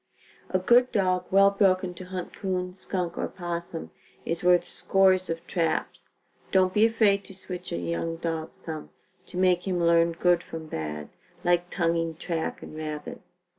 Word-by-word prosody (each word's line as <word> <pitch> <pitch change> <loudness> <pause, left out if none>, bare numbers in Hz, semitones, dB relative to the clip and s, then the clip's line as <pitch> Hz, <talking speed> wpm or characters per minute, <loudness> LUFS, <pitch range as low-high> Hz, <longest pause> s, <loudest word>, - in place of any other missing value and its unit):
A 185 - +2
good 240 +7 +4
dog, 185 -3 +1
well 195 +1 +6
broken 185 -2 +2
to 180 +1 -9
hunt 185 -1 -6
'coon, 180 -2 -2
skunk 180 -2 -3
or - - 0
opossum 170 -2 -5 0.3
is 165 +1 -2
worth 180 0 +4
scores 190 -1 +3
of 165 0 -4
traps. 165 -3 -2 0.4
Don't 185 -1 +4
be 215 +2 +5
afraid 205 -3 +3
to 195 - -12
switch 180 -1 -7
a - - -1
young 85 - -2
dog 165 -1 -4
some, 155 -2 -7 0.4
to - - -8
make 180 0 +3
him 180 -2 0
learn 170 0 +4
good 175 +1 +3
from 165 -2 -8
bad, 75 - -5 0.3
like 175 0 +2
tonguing 165 -2 0
track 165 0 -3
and - - -9
rabbit. 155 -1 -6
180 Hz, 165 wpm, -27 LUFS, 165-185 Hz, 0.4 s, well